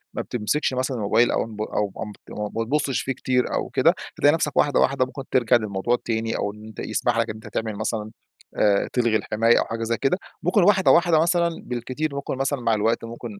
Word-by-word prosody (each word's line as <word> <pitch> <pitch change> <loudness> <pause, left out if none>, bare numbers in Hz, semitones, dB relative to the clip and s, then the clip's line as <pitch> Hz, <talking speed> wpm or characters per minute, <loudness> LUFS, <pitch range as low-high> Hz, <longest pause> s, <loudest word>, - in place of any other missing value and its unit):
ما - - -1
بتمسكش 125 +5 -1
مثلًا 130 0 -1
الموبايل 115 +3 +2
أو - - 0
نب 110 -1 -8
أو 105 -1 -1
امت 105 -1 -9
م 105 - -5 0.2
ما - - +1
بتبُصّش 140 +2 0
فيه 135 - -2
كتير 125 0 0
أو - - -2
كده، - - +3 0.2
هتلاقي 145 - +5
نفسك 155 -2 -1
واحدة، 145 -2 +3
واحدة 130 -1 +2
ممكن 135 +1 -8
ترجع 120 -1 +3
للموضوع 105 0 0
التاني 115 -1 -2
أو 100 - -2
إن 105 0 -13
أنت 110 - -11
يسمح 120 -2 -1
لك 115 0 +1
إن 110 - -4
أنت 110 - -11
تعمل 110 -2 -3
مثلًا 110 0 -3 0.5
آآ 100 -2 +2
تلغي 120 -3 +2
الحماية 115 +2 +2
أو - - 0
حاجة 115 0 -4
زي 115 +1 -1
كده. 140 +7 +1 0.3
ممكن 180 +3 +3
واحدة 190 0 +5
واحدة 170 -2 +4
مثلًا 170 +1 +2 0.2
بالكتير 130 +5 -3
ممكن 140 -1 -4
مثلًا 135 -1 -1
مع 115 -1 +2
الوقت 110 +2 +1
ممكن 115 -2 -8
120 Hz, 220 wpm, -23 LUFS, 110-140 Hz, 0.5 s, هتلاقي